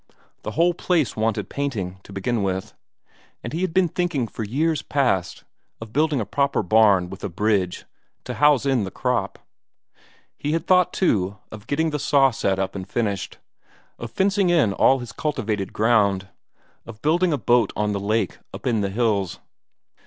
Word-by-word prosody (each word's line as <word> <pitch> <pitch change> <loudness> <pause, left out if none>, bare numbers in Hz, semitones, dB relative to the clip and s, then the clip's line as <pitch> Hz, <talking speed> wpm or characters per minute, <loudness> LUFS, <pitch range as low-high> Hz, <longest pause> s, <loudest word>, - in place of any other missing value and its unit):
The - - -5
whole 175 +2 +4
place 165 -7 0
wanted 110 0 -1
painting, 105 -10 -4
to - - -13
begin 100 +4 -1
with. 95 -1 -2 0.7
And - - -6
he 165 - -2
had 185 -2 0
been 185 +1 +3
thinking 165 -7 -1
for 110 - -6
years 150 +8 0
past 110 -11 -1 0.4
of 115 -1 -10
building 150 -1 +2
a 110 - -2
proper 140 -1 0
barn 100 -2 +4
with 95 +2 -10
a 100 - -2
bridge, 95 -1 0 0.4
to - - -5
house 145 -2 +3
in 135 -5 +2
the 95 - -4
crop. - - -2 1.0
He 150 +1 -1
had 165 0 -1
thought, 180 -1 +4
too, 100 - 0
of 110 +1 -11
getting 160 +3 0
that 150 - -2
saw 135 -1 +4
set 95 -5 -1
up 95 0 -2
and 95 -1 -6
finished; 100 -5 -2 0.6
of - - -6
fencing 195 -1 +1
in 150 - +3
all 135 +6 +4
his 120 -3 -7
cultivated 110 - -2
ground; 100 -4 +2 0.5
of 115 -1 -12
building 170 +4 +2
a 145 - +1
boat 120 -4 +2
on 105 0 0
the 100 - -2
lake 105 0 -1
up - - -10
in 115 -4 +1
the 100 - -1
hills. 100 -4 0
115 Hz, 175 wpm, -23 LUFS, 100-150 Hz, 1.0 s, whole